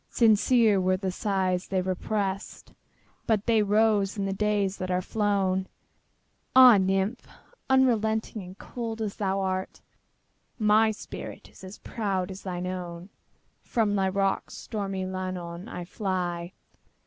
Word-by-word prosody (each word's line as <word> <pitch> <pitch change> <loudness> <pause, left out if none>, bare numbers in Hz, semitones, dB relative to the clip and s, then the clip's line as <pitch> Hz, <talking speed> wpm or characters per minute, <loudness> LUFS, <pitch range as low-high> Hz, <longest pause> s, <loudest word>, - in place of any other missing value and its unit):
Sincere 220 -2 +4
were 185 0 +2
the 190 0 -2
sighs 185 -2 -1
they 190 - 0
represt, 190 +2 -3 0.5
But 215 -2 +1
they 225 -2 +3
rose 210 -1 +2
in 200 - -1
the 195 - -1
days 205 -1 0
that 185 - -4
are 180 0 +1
flown! 190 -2 0 0.9
Ah, 255 -4 +9
nymph! 195 +5 0 0.4
unrelenting 220 -5 +2
and 185 +1 -11
cold 230 -2 -6
as 215 -3 -3
thou 195 -1 0
art, 190 0 -3 0.8
My 215 0 +4
spirit 215 - -8
is 190 +2 -9
proud 195 -4 -2
as 190 +1 -8
thine 180 -1 -4
own! 180 0 -6 0.5
From 220 -3 0
thy 190 -1 +2
rocks, 195 0 -1
stormy 195 -4 -4
Llannon, 185 -1 -5
I 180 -1 -6
fly. 180 -3 -3
195 Hz, 130 wpm, -27 LUFS, 185-215 Hz, 0.9 s, Ah